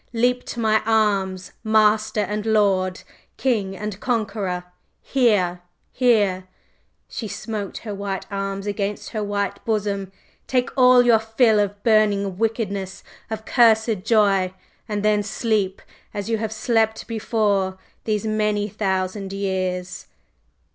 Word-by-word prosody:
Leap 245 +2 +1
to 240 - -6
my 220 -1 +3
arms, 200 -4 +1
master 215 0 +3
and 210 +1 -2
lord, 190 -4 +2 0.3
king 205 -7 0
and 210 -1 -5
conqueror! 205 -7 -2 0.4
Here, 205 -9 +1 0.3
here!" 235 -5 +4
and 185 +1 -9 0.6
she 225 - -5
smote 210 -2 -5
her 215 -3 -6
white 200 -1 -4
arms 195 0 -3
against 205 0 -3
her 215 -2 -2
whiter 200 -1 -2
bosom. 200 -3 -1 0.4
"Take 250 -1 0
all 250 -2 +6
your 235 -2 +5
fill 220 0 +3
of 205 0 -2
burning 205 -4 +2
wickedness 200 -4 -2 0.3
of 220 0 -5
cursed 220 -4 +3
joy! 195 -4 +2 0.3
and 210 0 -2
then 210 -1 +3
sleep! 205 -2 -1 0.3
as 205 +2 -3
you 225 - +1
have 220 -1 -3
slept 220 0 0
before, 205 -4 0 0.3
these 215 -1 -1
many 210 -1 0
thousand 190 -1 -2
years!" 185 -2 -3
210 Hz, 125 wpm, -22 LUFS, 195-220 Hz, 0.6 s, all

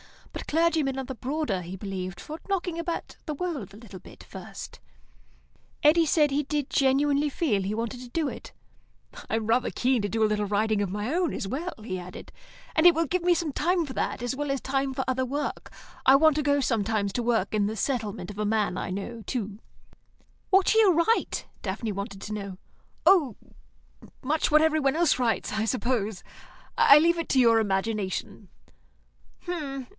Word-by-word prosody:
But - - -7
clergymen 315 -4 +1
are 265 - -3
the 265 - -5
broader, 255 -7 -2
he 175 +2 -7
believed, 185 -2 -5
for 310 +2 -8
knocking 355 -3 -1
about 335 0 -4
the 305 - -3
world 285 - -4
a - - -12
little 210 -5 -11 0.3
first. - - -9 1.0
Eddy 325 +3 +5
said 300 -2 +3
he 290 +2 +1
did 290 -1 -2
genuinely 285 +2 +2
feel 265 - 0
he 200 +3 -2
wanted 230 +2 -3
to 250 - -10
do 315 +3 -1
it. - - -7 0.8
"I'm 220 0 -1
rather 230 +3 +2
keen 255 -2 +1
to 205 - -2
do 225 +2 0
a - - +6
little 210 -1 0
writing 210 +1 +1
of 200 - -1
my 210 - -3
own 350 -1 +1
as 195 - -4
well," 315 - -3
he 185 -4 -4
added, 180 +1 -10 0.4
"and 315 0 +3
it 345 - +7
will 330 0 +1
leave 365 - +1
me 350 +1 +4
some 330 -4 -2
time 345 +3 +1
for 265 - -7
that, - - -2
as 245 +2 -2
well 290 +1 -3
as 275 - -1
time 270 +1 -1
for 265 0 -2
other 260 0 0
work. 285 +3 -4 0.3
I 265 - +8
want 310 +1 +5
to 300 - +1
go 285 0 +2
sometimes 215 -5 0
to 245 - -1
work 225 -5 0
in 205 -1 +2
the 220 - -3
settlement 210 -6 -2
of 205 - -10
a 210 - 0
man 210 -3 0
I - - -3
know, 200 +5 -5
too." 215 -5 -4 0.9
"What 385 -1 +4
shall 445 - +5
you 395 -4 +5
write?" 335 +8 +1 0.2
Daphne 215 +3 -3
wanted 200 0 -6
to 215 - -5
know. 200 -3 -5 0.5
"Oh, 325 - +5 0.9
much 300 +4 +1
what 305 0 +5
every 315 0 +3
one 275 -1 +1
else 330 -6 +2
writes, 235 -4 0
I 220 +1 0
suppose. 225 -4 -1 0.5
I 280 - +8
leave 335 +2 +3
it 335 - -4
to 265 - +3
your 230 -2 +5
imagination." 205 -1 -2
255 Hz, 190 wpm, -27 LUFS, 210-300 Hz, 1.0 s, I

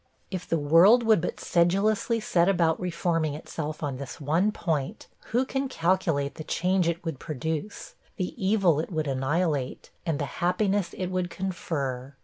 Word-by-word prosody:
If 185 -2 -5
the 165 - +2
world 170 +11 +6
would 220 -5 +4
but 180 - -3
sedulously 200 +6 +2
set 180 -4 +2
about 170 -4 +2
reforming 170 -4 -1
itself 155 0 -5
on 140 -3 -2
this 140 +2 -7
one 165 +8 +2
point, 165 0 -2 0.2
who 245 +4 +1
can 270 +1 -2
calculate 165 - +1
the 155 - -7
change 180 +2 +1
it 170 +1 -4
would 160 -5 -3
produce 160 +6 -4 0.2
the 185 -2 -3
evil 190 -6 +3
it 160 - -3
would 155 -2 -1
annihilate, 140 +1 -1
and 160 -3 -1
the 145 - -2 0.2
happiness 190 +1 +1
it 185 -1 -3
would 185 -1 -1
confer! 140 -8 -4
170 Hz, 160 wpm, -27 LUFS, 155-190 Hz, 0.2 s, world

